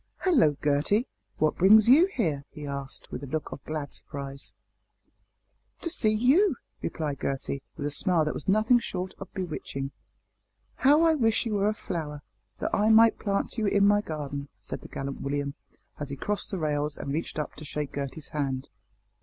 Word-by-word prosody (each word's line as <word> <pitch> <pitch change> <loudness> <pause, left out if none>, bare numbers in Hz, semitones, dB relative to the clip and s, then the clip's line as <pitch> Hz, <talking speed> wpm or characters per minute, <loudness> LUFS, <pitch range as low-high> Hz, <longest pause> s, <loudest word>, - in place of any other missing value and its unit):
"Hallo! 245 - +4
Gertie 150 - +2 0.3
what 155 0 +1
brings 210 +4 +7
you 300 +9 +7
here?" 160 - -1
he 150 - -9
asked, 140 -1 -5
with - - -5
a 140 - -6
look 155 +3 -3
of 135 - -8
glad 155 -2 -4
surprise. 140 -1 -6 1.3
"To 335 - -1
see 215 - +3
you," 265 - +4 0.3
replied 150 -4 -3
Gertie, 135 0 -2 0.2
with 145 - -3
a 145 - -1
smile 165 +2 +2
that 150 - -1
was - - -6
nothing 215 +5 +4
short 185 -4 -4
of 195 - -8
bewitching. 150 -7 -4 0.9
"How 295 +4 +5
I 325 -1 +5
wish 225 -6 +2
you 225 - -1
were 205 0 +2
a - - 0
flower, 150 -8 -5 0.3
that - - -3
I 210 +1 +3
might 225 +1 +6
plant 200 +3 -1
you 215 - +1
in 200 0 +4
my 205 0 +4
garden," 145 -5 -5
said - - -6
the - - -10
gallant 135 0 -5
William, 140 0 -2 0.5
as 145 -1 -4
he 140 - -4
crossed 205 +9 -2
the 195 - -3
rails 150 -2 -1
and 140 - -4
reached 160 +2 -3
up 150 - -3
to - - -8
shake 150 -1 -4
Gertie's 140 +1 -5
hand. 135 -3 -2
155 Hz, 185 wpm, -28 LUFS, 140-215 Hz, 1.3 s, brings